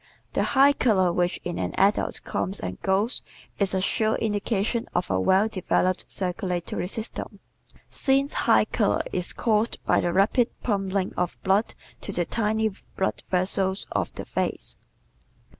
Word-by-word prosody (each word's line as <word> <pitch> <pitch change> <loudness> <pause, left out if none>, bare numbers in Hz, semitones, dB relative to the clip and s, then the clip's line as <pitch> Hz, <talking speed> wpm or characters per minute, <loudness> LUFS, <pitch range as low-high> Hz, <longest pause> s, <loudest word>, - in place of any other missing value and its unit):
The - - +1 0.2
high 280 +1 +7
color 190 -10 +2
which 175 0 0
in 175 -1 -4
an 90 -1 -2
adult 200 +2 +2
comes 190 +3 -1
and - - -5
goes 200 +6 +1 0.4
is 195 -2 +1
a 190 - +1
sure 220 +3 +1
indication 215 +2 -1
of 175 - 0
a 95 - +2
well 190 - +4
developed 185 -2 0
circulatory 180 -2 -2
system, 225 +4 -5 0.5
since 275 +1 +1 0.2
high - - +6
color - - +1
is 180 -1 -1
caused 220 -1 +1
by - - +3
the 175 - 0
rapid 220 +6 +3
pumping 195 -3 -1
of 180 -1 -1
blood 195 +3 +2 0.3
to - - -3
the 175 -2 -1
tiny 220 +1 0 0.3
blood 190 - -1
vessels 190 +1 +1
of - - -1
the - - -6
face. - - -2
195 Hz, 150 wpm, -25 LUFS, 185-220 Hz, 0.5 s, high